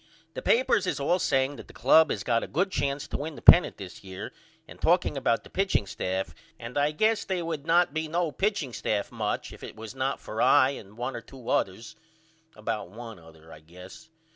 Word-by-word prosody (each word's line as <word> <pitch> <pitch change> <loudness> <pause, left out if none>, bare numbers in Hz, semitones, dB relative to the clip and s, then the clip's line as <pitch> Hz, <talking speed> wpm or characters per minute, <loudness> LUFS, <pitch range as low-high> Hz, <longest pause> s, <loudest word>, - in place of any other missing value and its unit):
The - - -5
papers 245 - +2
is 145 - -1
all 175 +6 +1
saying 135 -2 +1
that - - -11
the - - -16
club 160 -1 +5
has - - -2
got 115 -2 +1
a - - -5
good 185 +6 0
chance 140 -3 -2
to - - -3
win 150 +2 -5
the - - -11
pennant 175 - +7
this 95 -2 -10
year 95 -1 -7 0.4
and - - -14
talking - - +2
about 115 - 0
the - - -14
pitching 190 - +1
staff 95 -1 -3 0.2
and 120 +1 -9
I 145 +1 +2
guess 215 +8 +1
they 185 -2 -2
would 160 -2 -5
not 170 -2 +3
be 160 0 -2
no 170 0 -1
pitching 190 - -1
staff 105 -3 -2
much 110 -3 -3
if - - -13
it - - -8
was 110 0 -9
not 135 +1 -2
for 110 - -5
I 130 +1 +6
and 105 -5 -10
one 125 +3 -3
or - - -5
two 130 -3 -11
others 105 +4 -1 0.6
about 110 -3 -4
one 115 0 -10
other 80 -1 -16
I 75 - -12
guess. 90 - -14
135 Hz, 215 wpm, -27 LUFS, 105-160 Hz, 0.6 s, pennant